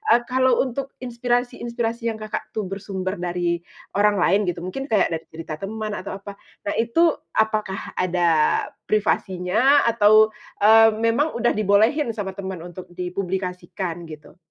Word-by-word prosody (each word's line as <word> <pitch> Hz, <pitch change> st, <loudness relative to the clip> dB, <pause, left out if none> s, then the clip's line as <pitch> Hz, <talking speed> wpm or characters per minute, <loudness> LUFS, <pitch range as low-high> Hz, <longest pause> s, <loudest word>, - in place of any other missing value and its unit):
eee, 240 Hz, -, +2 dB
kalau 260 Hz, -1 st, +3 dB
untuk 270 Hz, +1 st, -5 dB
inspirasi-inspirasi 240 Hz, -1 st, -2 dB
yang 225 Hz, -, -1 dB
Kakak 215 Hz, 0 st, -4 dB
tuh, 215 Hz, -, -1 dB
bersumber 190 Hz, -1 st, -4 dB
dari 175 Hz, -1 st, -1 dB, 0.4 s
orang 210 Hz, 0 st, +4 dB
lain 195 Hz, +1 st, +3 dB
gitu, 175 Hz, -1 st, -3 dB
mungkin 270 Hz, +10 st, -5 dB
kayak 210 Hz, -9 st, +2 dB, 0.2 s
cerita 160 Hz, -1 st, -6 dB
teman 215 Hz, +4 st, -5 dB
atau 195 Hz, +1 st, -6 dB
apa. 200 Hz, 0 st, -9 dB, 0.3 s
Nah -, -, 0 dB
itu 235 Hz, +8 st, +1 dB, 0.3 s
apakah 215 Hz, -3 st, -1 dB
ada 180 Hz, -1 st, +2 dB, 0.6 s
privasinya 215 Hz, +5 st, +2 dB
atau, 215 Hz, -1 st, +5 dB, 0.3 s
eee, 225 Hz, +1 st, +7 dB
memang 240 Hz, +7 st, +2 dB
udah 240 Hz, 0 st, +1 dB
dibolehin 220 Hz, +6 st, +3 dB
sama 205 Hz, -3 st, -4 dB
teman 190 Hz, -3 st, -5 dB
untuk 180 Hz, +1 st, -9 dB
dipublikasikan, 180 Hz, -1 st, -4 dB
gitu? 155 Hz, +1 st, -12 dB
205 Hz, 135 wpm, -23 LUFS, 180-230 Hz, 0.6 s, eee